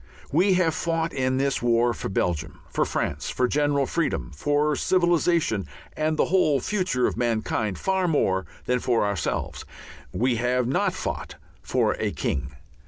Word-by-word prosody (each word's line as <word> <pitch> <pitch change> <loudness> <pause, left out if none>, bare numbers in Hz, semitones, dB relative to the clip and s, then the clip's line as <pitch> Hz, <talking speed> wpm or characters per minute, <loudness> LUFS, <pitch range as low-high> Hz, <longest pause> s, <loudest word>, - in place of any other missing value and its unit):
We 185 +6 +4
have 175 -3 +2
fought 165 -1 -1
in 130 -1 0
this 135 0 0
war 120 0 +3
for - - -5
Belgium, 90 -4 -2
for - - +1
France, 70 -1 -2
for 125 - +1
general 145 0 +1
freedom, 150 - -1
for 145 - +1
civilization 170 - +2 0.3
and 155 0 0
the - - +3
whole 160 -6 +3
future 180 -6 0
of - - -1
mankind, 110 -4 -1
far 190 -1 0
more 95 - +1 0.2
than 125 0 +1
for 120 -3 +1
ourselves. 100 -4 -2 0.5
We 125 0 +1
have 125 +1 +1
not 130 - +1
fought - - -4 0.3
for - - +1
a - - 0
king. 70 0 -3
130 Hz, 155 wpm, -25 LUFS, 115-165 Hz, 0.5 s, We